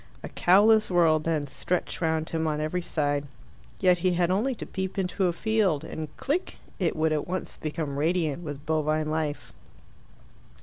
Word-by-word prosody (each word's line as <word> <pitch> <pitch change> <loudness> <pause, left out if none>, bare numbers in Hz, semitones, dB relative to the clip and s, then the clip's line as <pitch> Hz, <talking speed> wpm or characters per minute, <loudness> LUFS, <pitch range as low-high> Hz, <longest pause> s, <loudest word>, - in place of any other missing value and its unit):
A - - -5
cowless 215 +4 +5
world, 165 -4 +3
then, 160 -3 0
stretched 145 +8 -3
round 160 -1 0
him 160 -1 0
on 150 -1 -1
every 155 +4 -1
side. 145 -4 -1 0.5
Yet 180 -2 +4
he 180 +1 +2
had 175 0 +1
only 235 +8 +1
to - - -7
peep 190 0 -4
into 190 0 0
a - - +2
field, 190 -5 +1
and, 160 -1 -5
click! 320 +7 -2 0.2
it 175 -4 +1
would 155 0 +1
at 150 - -2
once 185 +1 -4
become 150 -2 -3
radiant 160 -1 0
with 145 -2 -7
bovine 155 0 0
life. 155 -2 -3
160 Hz, 170 wpm, -27 LUFS, 155-185 Hz, 0.5 s, cowless